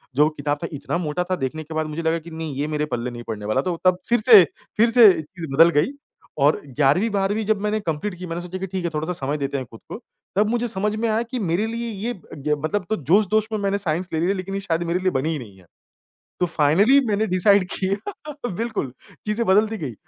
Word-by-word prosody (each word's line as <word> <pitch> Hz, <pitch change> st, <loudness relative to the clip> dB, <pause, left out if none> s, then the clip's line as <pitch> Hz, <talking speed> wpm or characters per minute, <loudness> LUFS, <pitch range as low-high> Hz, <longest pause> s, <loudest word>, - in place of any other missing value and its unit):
जो 150 Hz, -, +5 dB
वो 155 Hz, -, +3 dB
किताब 145 Hz, 0 st, -1 dB
था -, -, -1 dB
इतना 145 Hz, +4 st, -3 dB
मोटा 175 Hz, 0 st, -2 dB
था, -, -, +3 dB
देखने 155 Hz, +2 st, -4 dB
के 160 Hz, +1 st, -9 dB
बाद 155 Hz, 0 st, -1 dB
मुझे 155 Hz, +2 st, -4 dB
लगा 165 Hz, +1 st, +1 dB
कि 165 Hz, +1 st, -12 dB
नहीं 160 Hz, -2 st, -5 dB
ये 145 Hz, +2 st, -2 dB
मेरे 150 Hz, 0 st, -1 dB
पल्ले 120 Hz, +1 st, -2 dB
नहीं 120 Hz, 0 st, -8 dB
पड़ने 105 Hz, -2 st, -5 dB
वाला। 110 Hz, +5 st, +1 dB
तो 180 Hz, +3 st, -2 dB
तब 185 Hz, -1 st, +5 dB
फिर 240 Hz, -1 st, +4 dB
से 215 Hz, -4 st, +9 dB, 0.3 s
फिर 230 Hz, +2 st, +5 dB
से 240 Hz, -2 st, +7 dB
ये 180 Hz, -4 st, +4 dB
चीज़ 165 Hz, +2 st, -9 dB
बदल 165 Hz, +3 st, +7 dB
गई। 205 Hz, -, +1 dB, 0.5 s
और 145 Hz, +2 st, +3 dB
11वीं 145 Hz, -, +2 dB
12वीं 205 Hz, +2 st, 0 dB
जब 215 Hz, -2 st, +1 dB
मैंने 210 Hz, +1 st, 0 dB
कंप्लीट 175 Hz, +2 st, -3 dB
की 185 Hz, -, -6 dB
मैंने 170 Hz, +1 st, -4 dB
सोचा 180 Hz, +1 st, -6 dB
कि 190 Hz, -, -4 dB
ठीक 185 Hz, -1 st, -4 dB
है -, -, +1 dB
थोड़ा-सा 160 Hz, +4 st, -2 dB
समय 145 Hz, +2 st, -1 dB
देते 140 Hz, 0 st, -2 dB
हैं 130 Hz, -, -4 dB
खुद 115 Hz, -, -12 dB
को, -, -, -5 dB, 0.4 s
तब 210 Hz, +1 st, +3 dB
मुझे 240 Hz, +1 st, 0 dB
समझ 210 Hz, 0 st, -1 dB
में 230 Hz, +1 st, -1 dB
आया 220 Hz, +2 st, +1 dB
कि 245 Hz, +2 st, -5 dB
मेरे 190 Hz, +1 st, 0 dB
लिए 235 Hz, +1 st, -4 dB, 0.2 s
ये 245 Hz, -, -1 dB, 0.2 s
ग 150 Hz, +2 st, 0 dB
मतलब 195 Hz, +2 st, -1 dB
तो 220 Hz, -, +1 dB
जोश-दोश 210 Hz, -, +2 dB
में 215 Hz, -, 0 dB
मैंने 200 Hz, 0 st, 0 dB
साइंस 180 Hz, -1 st, -2 dB
ले 160 Hz, -, 0 dB
लिया 180 Hz, +4 st, +1 dB
लेकिन 195 Hz, +1 st, -5 dB
ये 195 Hz, -, -2 dB
शायद 170 Hz, -3 st, -1 dB
मेरे 170 Hz, +2 st, -1 dB
लिए 185 Hz, 0 st, +1 dB
बनी 135 Hz, +3 st, -1 dB
ही 155 Hz, -, -2 dB
नहीं 100 Hz, -6 st, -11 dB
है। 90 Hz, -, -20 dB, 0.7 s
तो 180 Hz, -, +3 dB
फाइनली 175 Hz, -, +4 dB
मैंने 210 Hz, +1 st, +1 dB
डिसाइड 185 Hz, +1 st, +4 dB
किया 245 Hz, -, -4 dB
बिल्कुल, 220 Hz, -, -3 dB, 0.3 s
चीज़ें 220 Hz, +2 st, 0 dB
बदलती 215 Hz, +3 st, +3 dB
गई। 140 Hz, -, -5 dB
180 Hz, 250 wpm, -22 LUFS, 150-210 Hz, 0.7 s, से